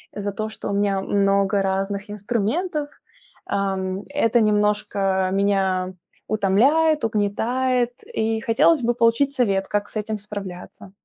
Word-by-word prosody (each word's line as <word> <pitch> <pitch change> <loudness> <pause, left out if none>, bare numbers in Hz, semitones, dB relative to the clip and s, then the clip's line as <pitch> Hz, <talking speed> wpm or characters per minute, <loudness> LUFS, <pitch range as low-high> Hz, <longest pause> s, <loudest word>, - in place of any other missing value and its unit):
за 205 0 -3
то, 215 +2 -4
что 220 - -7
у - - -1
меня 200 -1 +1
много 200 0 +2
разных 195 +1 -2
инструментов, 245 - -2 0.6
ам, 190 0 -2
это 240 -5 +2
немножко 205 -3 +1
меня 190 -2 +1 0.3
утомляет, 270 +11 +3
угнетает, 240 +4 0 0.2
и 220 0 0
хотелось 255 +5 +3
бы 240 +1 +2
получить 235 +4 +2
совет, 200 -7 +1
как 205 0 -1
с - - -17
этим 215 0 -2
справляться. 195 -2 -8
205 Hz, 125 wpm, -22 LUFS, 195-235 Hz, 0.6 s, утомляет